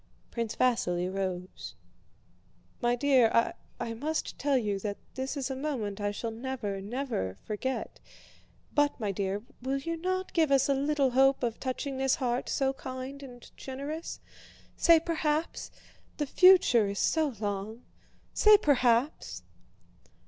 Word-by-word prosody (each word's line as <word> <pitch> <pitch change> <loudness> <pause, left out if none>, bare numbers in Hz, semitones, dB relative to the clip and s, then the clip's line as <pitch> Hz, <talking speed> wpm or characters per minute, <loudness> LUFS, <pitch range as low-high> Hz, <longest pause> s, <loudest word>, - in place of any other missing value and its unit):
Prince 230 -2 -3
Vasíli 185 -8 +1
rose. 185 -1 -4 1.1
"My 240 0 +2
dear, 245 -4 +3 0.3
I 230 - -3
must 305 +7 -3
tell 280 -1 +2
you 205 -5 -1
that 205 0 -4 0.2
this 265 +2 -4
is 270 -1 -2
a - - -3
moment 240 -8 -3
I 205 - 0
shall 225 +3 -4
never, 225 -4 -4
never 210 - -3
forget. 255 +5 -4 0.7
But, 290 -1 +2
my 210 -3 -1
dear, 195 +1 -2 0.2
will 265 +2 -1
you 330 +5 -3
not 370 +2 -2
give 320 -4 +2
us 275 -1 +4
a 280 - +3
little 280 -1 +1
hope 270 +1 +4
of 230 -2 -1
touching 265 +1 -3
this 265 0 +2
heart, 250 -4 -2
so 270 -1 +1
kind 260 +1 -7
and 245 -3 -12
generous? 285 +5 -6 0.6
Say 335 -2 +6
'perhaps'... 315 -1 -1 0.5
The 295 - 0
future 320 - +6
is 200 0 -4
so 305 -1 +1
long. 205 +2 -4 0.5
Say 425 0 +7
'perhaps. 260 - +1
260 Hz, 140 wpm, -29 LUFS, 220-285 Hz, 1.1 s, Say